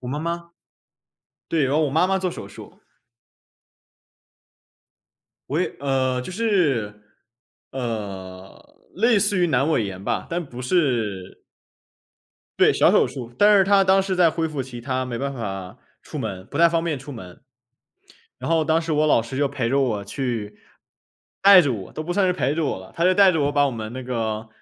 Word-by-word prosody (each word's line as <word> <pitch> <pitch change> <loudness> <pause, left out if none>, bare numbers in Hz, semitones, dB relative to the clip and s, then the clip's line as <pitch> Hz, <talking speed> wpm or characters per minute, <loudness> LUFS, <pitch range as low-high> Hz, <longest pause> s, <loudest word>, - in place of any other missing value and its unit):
我 125 - -7
妈 145 - -3
妈 170 +1 -4 1.0
对， 160 -4 +1
然 135 - -1
后 155 - +3
我 140 - -3
妈 160 +5 +3
妈 195 0 +1
做 185 -1 -2
手 - - -8
术。 - - -13 2.7
我 155 +5 0
也 - - -3
呃， 130 -2 0
就 185 - -8
是 145 - 0 0.7
呃， 100 -6 -6 0.3
类 225 +2 +3
似 200 -1 +1
于 175 - +3
阑 140 -2 +1
尾 115 - +1
炎 95 -1 -7
吧， - - -2
但 170 0 -2
不 125 -2 -9
是 120 - -1 1.2
对， - - +5
小 - - +4
手 - - +4
术。 120 -3 -8
但 205 +3 +5
是 195 - +5
她 200 +1 +4
当 190 0 +4
时 190 -1 -2
在 175 -3 +4
恢 165 0 -1
复 145 -4 -4
期， 120 -2 -9
她 130 +1 -2
没 120 -2 -5
办 140 +1 -3
法 95 -5 -6 0.3
出 - - -8
门， 95 0 -5
不 140 - -8
太 170 +1 +6
方 165 0 0
便 155 -5 -2
出 135 +3 -11
门。 95 -6 -11 1.0
然 - - -5
后 160 -1 +2
当 160 +1 +2
时 160 -1 -3
我 155 +1 +2
老 145 - +4
师 115 +3 -7
就 145 0 +1
陪 135 -4 -2
着 140 +3 +2
我 110 -6 -1
去。 115 -2 -4 0.9
带 200 -2 +9
着 145 -7 0
我 100 -5 -7
都 155 - -6
不 175 - -3
算 195 +2 +2
是 - - +2
陪 150 -5 -1
着 160 -1 -1
我 115 - -2
了。 95 0 -13
他 170 - -3
就 185 - +5
带 195 -1 +6
着 160 - 0
我 145 0 +1
把 145 0 +3
我 - - -1
们 110 0 -6
那 130 - -6
个 115 -3 -3
140 Hz, 210 characters per minute, -22 LUFS, 115-170 Hz, 2.7 s, 带